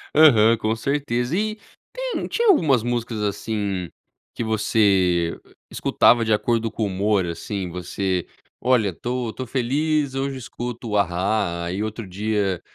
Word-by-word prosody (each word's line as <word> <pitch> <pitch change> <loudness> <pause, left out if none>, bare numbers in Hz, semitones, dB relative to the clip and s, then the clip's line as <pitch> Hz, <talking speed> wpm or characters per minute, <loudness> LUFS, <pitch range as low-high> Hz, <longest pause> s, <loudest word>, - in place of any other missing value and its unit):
Aham, 115 -7 +6
com 110 0 -1
certeza. 125 +1 -1
E 215 +1 -1 0.4
tem - - -3
tinha 470 0 0
algumas 140 - +4
músicas, 120 -2 -2
assim, 100 -3 -2 0.4
que - - -3
você, 100 -6 +2
eh, - - -23
escutava 120 -1 +3
de 110 - +2
acordo 115 +1 0
com 110 - -3
o - - +2
humor, 100 0 +1
assim, 90 +3 -4
você: 90 +1 -2 0.4
"Olha, 110 -7 +2
tô 120 +2 -3
tô 130 - -5
feliz, 140 +3 0
hoje 135 0 -2
escuto 120 -2 -5
A-ha". 90 -2 0
E 100 +3 -2
outro 110 -1 -5
dia, 100 -1 -1
110 Hz, 140 wpm, -23 LUFS, 100-125 Hz, 0.4 s, Aham